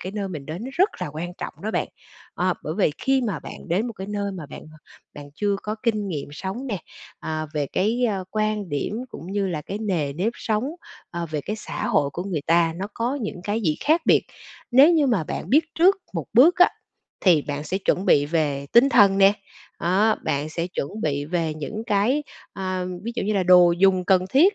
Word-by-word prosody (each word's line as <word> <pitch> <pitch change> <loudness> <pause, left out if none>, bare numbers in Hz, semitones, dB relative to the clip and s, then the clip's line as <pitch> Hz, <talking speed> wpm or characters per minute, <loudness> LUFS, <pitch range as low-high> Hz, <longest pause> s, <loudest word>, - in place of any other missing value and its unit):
cái 185 - -6
nơi 200 -2 -3
mình 150 -6 -7
đến 170 +9 -6
nó 265 - -6
rất 380 +4 +4
là - - -2
quan 160 +4 -6
trọng - - -5
đó 215 - -2
bạn. - - -1 0.5
Ờ, - - +1
bởi - - -4
vì - - +3
khi 270 -1 +2
mà 210 -9 -2
bạn - - -10
đến 190 +8 +1
một 235 - -5
cái 190 -1 -7
nơi 200 -1 -2
mà 170 -5 -7
bạn - - -10 0.5
bạn 145 -1 -10
chưa 205 +2 0
có 210 - -3
kinh 215 -4 0
nghiệm 150 -7 -4
sống 195 - -5
nè, 205 -7 -2 0.4
à, 155 0 -3
về 145 -1 0
cái, 225 - 0
ơ, 195 -3 -2
quan 215 -2 -1
điểm 145 +6 -2
cũng 185 -5 -9
như 200 -1 0
là 160 -4 -3
cái 200 +7 -5
nề 170 -10 -1
nếp 190 +10 -1
sống, 215 +1 -1 0.5
ờ, 170 -1 -4
về 150 -2 -2
cái 210 +8 -4
xã - - -5
hội 140 -1 +2
của 170 +5 -5
người 170 -7 -3
ta, 165 0 +3
nó 190 - -3
có 245 +5 -1
những 205 -5 -5
cái 210 +2 -1
gì 155 -8 0
khác 315 +3 +4
biệt. - - +5 0.5
Nếu 275 +7 +7
như 310 -4 +3
mà 210 -10 +1
bạn - - -5
biết 295 +5 +5
trước 370 +4 +5 0.2
một 165 -5 -3
bước 325 - +6
á, 360 - +7 0.5
thì 170 -6 +4
bạn 145 +1 -4
sẽ 185 +4 -2
chuẩn 190 -1 0
bị 145 0 +4
về 145 -3 -1
tinh 240 +4 +7
thần 195 -6 +5
nè, 195 0 +7 0.5
đó, 195 +6 +3
bạn 145 +2 -1
sẽ 165 +2 -3
chuẩn 185 +3 -5
bị 145 -4 -1
về 160 -1 -1
những 210 +9 -5
cái, 240 +7 +2 0.3
a, 185 -1 -3 0.2
ví 235 +3 -4
dụ - - -2
như 210 - 0
là 195 -2 +1
đồ 180 -1 +6
dùng 185 +1 +3
cần 185 -1 +3
thiết, 350 - +5
195 Hz, 225 wpm, -23 LUFS, 165-220 Hz, 0.5 s, Nếu